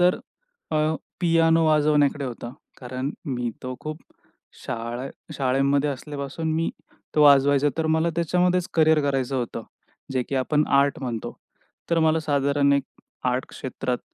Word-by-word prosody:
तर 180 +1 +4 0.5
अ, 155 - 0 0.4
पियानो 165 -1 +4
वाजवण्याकडे 150 -2 +3
होता. 120 -1 -6 0.3
कारण 130 +2 -4 0.2
मी 125 -4 -2
तो 130 0 -4
खूप 155 +1 -6 0.7
शाळे 120 +3 -4 0.2
शाळेमध्ये 140 +2 +1
असल्यापासून 145 +3 -4
मी 165 +1 0 0.4
तो 150 - +4
वाजवायचो 140 0 +5
तर 160 - +1
मला 160 +1 +2
त्याच्यामध्येच 180 +1 +1
करियर 160 -1 +4
करायचं 135 -2 0
होतं, 120 -2 -3 0.5
जे 130 - +1
की 140 - -3
आपण 150 +3 +1
आर्ट 140 0 +2
म्हणतो. 115 -3 -4 0.6
तर 170 - +3
मला 160 0 +3
साधारण 140 -1 +2
एक 140 0 +3 0.5
आर्ट 125 +1 -1
क्षेत्रात 125 -1 -4
145 Hz, 135 wpm, -24 LUFS, 130-160 Hz, 0.7 s, वाजवायचो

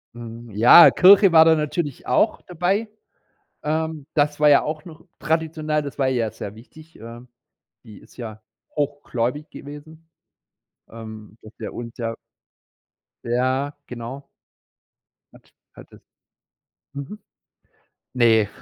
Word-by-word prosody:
Mhm, 115 -1 -10
ja, 120 +11 +8
Kirche 195 0 +6
war 160 -1 +7
da 160 -1 +5
natürlich 150 -2 -4
auch 125 - +1
dabei. 190 +5 -1 0.7
Ähm, 155 -1 -3
das 150 -1 +1
war 150 0 +4
ja 145 - +6
auch 155 0 -5
noch 165 -2 -14
traditionell. 155 -1 -1
Das 140 -1 -8
war 135 -1 +1
ihr 130 - 0
ja 115 -2 -1
sehr 100 - -8
wichtig, 155 +8 -17
ähm. 120 +2 -11 0.6
Die 105 -2 -14
ist - - -21
ja 110 -2 -8 0.3
hochgläubig 145 -1 -3
gewesen, 155 +3 -12 0.8
ähm, 110 -1 -11
dass 110 - -14
der - - -6
uns 120 0 -8
ja 115 -2 -4 1.1
Ja, 130 +4 -1
genau. 125 +3 -8 1.1
Hat - - -21 0.2
hattet. - - -16 0.9
Mhm. 140 +10 -8 0.9
Ne. 110 -4 +3
140 Hz, 125 wpm, -22 LUFS, 115-155 Hz, 1.1 s, ja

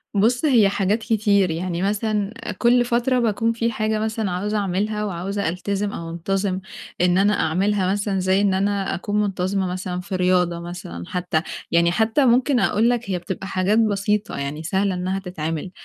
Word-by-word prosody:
بُص، 240 +8 +2
هي 230 -8 +5
حاجات 200 +2 +1
كتير، 205 -5 +2
يعني 175 +1 -3
مثلًا 210 +1 -1 0.2
كل 245 0 +4
فترة 245 +2 +1
باكون 230 0 +1
في 230 0 -1
حاجة 215 0 -1
مثلًا 220 -3 -2
عاوزة 205 +4 -1
أعملها 210 +2 -1
وعاوزة 195 0 -2
ألتزم 200 +3 -2
أو 165 0 -6
أنتظم 190 +3 -1 0.4
إن 180 0 +3
أنا 205 +2 +4
أعملها، 190 +3 +1
مثلًا 200 -1 -1
زي 190 +2 +2
إن 200 -2 +2
أنا 200 0 0
أكون 205 +3 -1
منتظمة 190 -1 -1
مثلًا 180 0 -4
في 190 0 -5
رياضة 180 -2 +2
مثلًا 170 - -7
حتّى، 175 -3 -1 0.3
يعني 170 0 +4
حتّى 220 +8 +2
ممكن 250 +2 +3
أقول 225 +1 +2
لك 240 -3 -1
هي 180 - -1
بتبقى 190 +2 -6
حاجات 190 +3 +1
بسيطة، 210 -1 0
يعني 145 +3 -4
سهلة 190 +3 0
إنها 185 +2 -2
تتعمل. 165 -2 -4
195 Hz, 170 wpm, -22 LUFS, 180-215 Hz, 0.4 s, هي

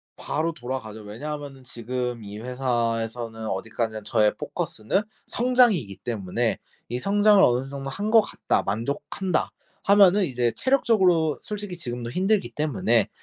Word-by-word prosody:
바로 160 +3 -2
돌아가죠. 120 -6 -6
왜냐하면은 135 +5 -7
지금 125 -1 -4
이 100 +1 -8
회사에서는 115 -2 -2
어디까지나 110 +2 -3
저의 105 0 +2
포커스는 110 - -2 0.2
성장이기 235 - +2
때문에 110 0 -2 0.3
이 120 +2 -3
'성장을 205 +2 +4
어느 125 +2 +2
정도 135 -1 -5
한 205 +10 -3
것 225 -1 +8
같다. - - -1
만족한다.'하면은 180 - +1
이제 125 -5 0
체력적으로 190 - +3
솔직히 205 -3 -5
지금도 120 -6 -5
힘들기 195 - +1
때문에 120 -7 +1
130 Hz, 340 characters per minute, -25 LUFS, 115-185 Hz, 0.3 s, 것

